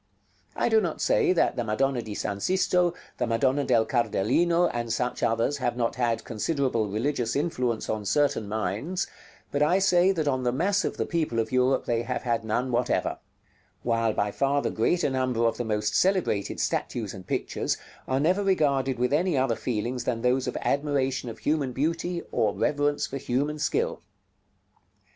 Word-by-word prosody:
I - - +1
do 440 - +4
not - - -3
say - - +3
that - - +2
the 120 - -1
Madonna 125 +4 0
di 110 -2 -7
S. 100 0 -3
Sisto, 180 -2 +2 0.2
the - - 0
Madonna 130 +5 +1
del 115 -4 +3
Cardellino, 135 - +2
and 120 -1 -3
such 125 +2 -1
others, 115 +5 +1
have 120 -3 -1
not 115 -2 0
had 120 -2 0
considerable 120 -2 -1
religious 115 +2 -1
influence 125 -7 -1
on 105 -1 -2
certain 115 -2 +1
minds, 110 - -2 0.5
but 145 - -1
I 155 +5 +4
say 190 -1 +4
that 160 -6 -1
on 130 -2 +1
the 125 -1 +1
mass 190 +10 +1
of - - -3
the - - 0
people 160 -9 -1
of 110 -1 0
Europe 130 +1 +2
they 115 -1 0
have 125 +2 -3
had 115 -2 0
none 120 +4 -1
whatever; 120 +1 0 0.6
while 115 -1 +1
by 105 0 0
far 140 +4 +1
the - - -1
greater 145 +7 +1
number 130 -3 0
of 115 - +1
the 120 - -2
most 105 -1 -1
celebrated 180 - +1
statues 110 -5 -2
and 95 -2 -10
pictures - - -1 0.3
are 130 0 +1
never 180 +7 +2
regarded 140 -9 +1
with 125 +3 0
any 170 0 +2
other 130 -3 +2
feelings 120 +2 -3
than 115 -2 -1
those 125 +1 +2
of - - -2
admiration 135 -3 0
of 110 - -8
human 145 -3 -1
beauty, 165 +5 -1
or 105 -2 +1
reverence 145 0 +1
for 135 - -5
human 140 +3 -1
skill. 465 - -1
130 Hz, 180 wpm, -26 LUFS, 115-150 Hz, 0.6 s, do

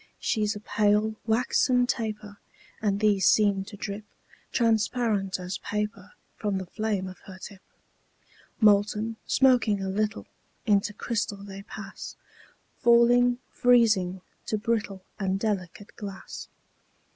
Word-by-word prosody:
She's 215 -1 0
a - - -6
pale, 210 +1 +2
waxen 250 +2 +3
taper; 215 -4 -4 0.4
And 200 -2 +1
these 205 -2 +3
seem 200 -2 +4
to 205 0 -10
drip 200 +2 -5 0.5
Transparent 220 -4 +1
as 180 +1 -5
paper 210 -1 -4 0.2
From 205 -2 -1
the 190 - -4
flame 210 0 -2
of 185 -1 -9
her 190 -1 -9
tip. 190 0 -10 1.0
Molten, 210 +1 +3
smoking 245 -6 +4
a 195 0 -3
little, 215 +3 -1 0.4
Into 205 -2 +2
crystal 205 -2 -3
they 195 -1 -8
pass; 200 0 -9 0.7
Falling, 240 +1 +5
freezing, 215 -7 +3 0.3
to 215 - 0
brittle 210 -4 -2 0.2
And 195 -1 0
delicate 200 -1 -3
glass. 200 -2 -8
210 Hz, 120 wpm, -27 LUFS, 195-225 Hz, 1.0 s, Falling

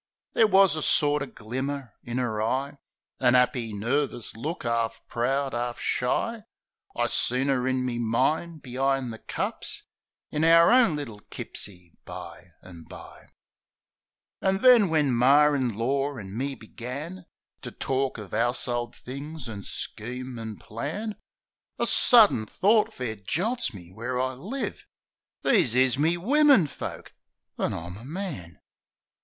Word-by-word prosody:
There 225 - +5
wus 195 -3 +5
a 155 - -3
sorter 145 -1 +3
glimmer 130 +2 -5
in 120 +1 -4
'er 110 -4 -1
eye. 135 +6 -1 0.4
An 125 - +4
'appy, 125 -2 +2
nervis 120 +4 -2
look, 150 +7 -5
'arf 115 -1 -1
proud, 135 +3 -1
'arf 120 0 -3
shy; 220 - -1 0.5
I - - +1
seen 130 +3 +1
'er 130 -1 0
in 130 -1 0
me 120 -2 -2
mind 155 +8 0
be'ind 130 -1 -1
the 110 - -10
cups - - -3 0.5
In 150 - -1
our 165 +2 +7
own 240 -10 +5
little 120 -8 -6
kipsie, 90 -4 -6
bye - - -9 0.2
an' 85 -3 -12
bye. - - -12 1.1
An' 195 +1 0
then 240 -7 +7
when 150 -5 +2
Mar 145 +5 +5
in 125 -6 -1
lor 135 +4 -1
an' 95 -1 -8
me 135 +3 -2
began 140 +11 -8 0.3
To - - -6
tork 135 -1 -2
of 105 -4 -9
'ouse'old 120 +1 -1
things 140 +2 -8
an' 105 -3 -6
scheme 125 +5 -5
an' 110 -2 -6
plan, 160 - -5 0.6
A - - +1
sudden 215 - +6
thort 210 - +3
fair 115 -4 -5
jolts 195 - -1
me 90 -5 -12
where 120 +5 -4
I 130 0 0
live: 210 - -5 0.6
"These 120 - +3
is 130 +1 +3
my 165 +3 +2
wimmin 275 - +5
folk! 145 - -7 0.5
An' - - 0
I'm 85 +3 -7
a 110 - -11
man!' 145 - -6
130 Hz, 140 wpm, -26 LUFS, 115-155 Hz, 1.1 s, our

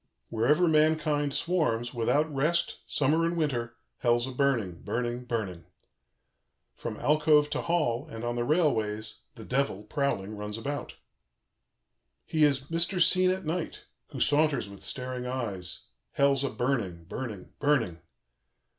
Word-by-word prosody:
"Wherever 145 +10 +3
mankind 155 -2 +2
swarms, 135 -8 0
without 145 +6 +1
rest, 165 +5 0
summer 150 +4 +2
and 170 +1 0
winter, 120 -7 -1 0.2
Hell's 120 0 +2
a 130 - -5
burning, 125 -10 0
burning, 120 +1 -2
burning. 100 -8 -3 1.1
"From 110 -2 -6
alcove 150 +1 +4
to - - -1
hall, 150 -6 0
and 115 -5 -7
on 120 0 -1
the 120 - 0
rail 155 +3 +3
ways, 110 0 -3 0.2
the 110 - -10
Devil, 125 -6 0
prowling, 110 -4 -1
runs 105 +1 -4
about. 145 +5 -4 1.3
"He 155 -1 +1
is 140 -3 +4
Mr. 170 +6 0
Seen 185 +1 +5
at 185 -1 -1
Night, 165 +2 -3 0.2
who 140 -4 -8
saunters 145 -3 +2
with 100 -1 -12
staring 125 -1 -4
eyes. 100 -9 -4 0.3
Hell's 140 -1 +3
a 140 - 0
burning, 110 -10 -1
burning, 105 +1 -6
burning. 125 - +1
135 Hz, 135 wpm, -29 LUFS, 115-150 Hz, 1.3 s, Seen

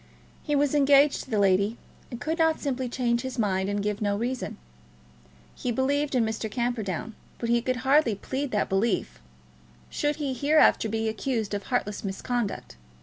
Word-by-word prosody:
He 295 - -1
was 285 0 +2
engaged 285 0 +4
to - - -18
the 220 - 0
lady, 200 +3 +2 0.3
and 240 - -7
could 320 +6 -2
not 320 -1 +3
simply 260 -3 -2
change 235 -1 0
his 260 0 -5
mind 195 -3 0
and 205 0 -1
give 210 0 -2
no 205 -1 +1
reason. 245 +3 -3 1.0
He 245 - -3
believed 275 +3 0
in 240 -3 +3
Mr. 220 0 -3
Camperdown; 225 -4 -2 0.2
but 235 - -3
he 235 0 +3
could 255 +1 -1
hardly 270 -5 +4
plead 265 +7 -3
that 210 -4 0
belief, 195 - 0 0.7
should 295 0 0
he 280 -3 -2
hereafter 285 -4 +4
be 225 +1 -1
accused 220 -2 -2
of 200 -1 -3
heartless 210 -5 -1
misconduct. 210 +3 -3
240 Hz, 170 wpm, -26 LUFS, 210-275 Hz, 1.0 s, engaged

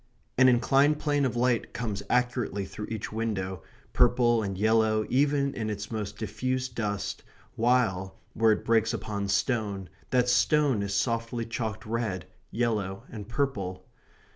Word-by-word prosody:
An 130 0 +6
inclined 135 +4 +4
plane 145 -2 +1
of 125 - -1
light 120 -1 +1
comes 105 -5 -3
accurately 125 -5 0
through 105 +2 -7
each 110 -2 -4
window, 95 -5 -2 0.3
purple 120 -1 +4
and 100 -3 -3
yellow 110 +1 +3
even 140 +1 +2
in 110 -2 -3
its 105 +1 -5
most 105 -2 -4
diffused 130 +5 -2
dust, 105 -3 -3 0.3
while, 110 -6 +1 0.2
where 110 0 +4
it - - -4
breaks 115 -1 +2
upon 100 -2 -3
stone, 100 - 0 0.2
that 125 -1 +2
stone 135 -1 +3
is 100 0 -2
softly 115 +2 -1
chalked 110 -2 -4
red, 110 -6 -2 0.2
yellow, 105 -5 -1
and 105 -2 -8
purple. 100 -9 -2
115 Hz, 140 wpm, -28 LUFS, 100-125 Hz, 0.3 s, An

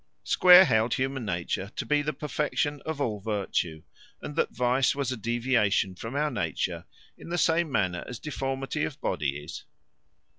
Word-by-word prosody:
Square 180 +1 +8
held 115 -3 +2
human 130 -1 -2
nature 95 +2 -3
to - - -3
be 150 0 +2
the 150 +1 -1
perfection 150 0 -2
of 160 -2 -3
all 110 -7 -1
virtue, 95 -6 -2 0.4
and 145 - -7
that - - +1
vice 125 +2 +1
was 140 -3 -2
a - - -1
deviation 115 -4 +1
from 115 +8 -7
our 150 +1 +1
nature, 85 - -2 0.3
in - - -10
the 175 - -1
same 165 -1 +2
manner 90 -7 0
as 125 - -6
deformity 135 0 -3
of 145 - -4
body 75 -6 -1
is. 80 +2 -8
125 Hz, 170 wpm, -27 LUFS, 100-145 Hz, 0.4 s, Square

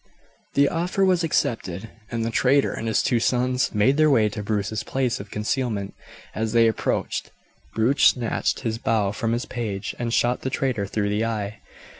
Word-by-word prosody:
The 140 0 +5
offer 180 +5 0
was 180 -2 +2
accepted, 110 - -1 0.2
and 115 -1 -2
the 115 - -2
traitor 135 +4 +3
and 115 - -4
his 110 - +2
two 120 - +2
sons 125 +2 +1
made 120 +7 +3
their 155 0 +5
way 110 -6 +4
to 105 - -5
Bruce's 105 0 -2
place 130 -3 -1
of 100 0 -9
concealment. 105 -2 -2 0.4
As 110 0 -2
they 115 -1 +5
approached, 110 - -1 0.5
Bruce 125 +6 +3
snatched 120 -3 +2
his 115 -3 -2
bow 110 -4 +1
from 115 +2 -2
his 120 +2 -1
page 105 -5 -4
and 120 -1 -2
shot 120 +1 +1
the 130 - -2
traitor 125 -7 -1
through 100 0 -1
the 105 +2 0
eye. 105 -2 -3
115 Hz, 180 wpm, -24 LUFS, 105-130 Hz, 0.5 s, The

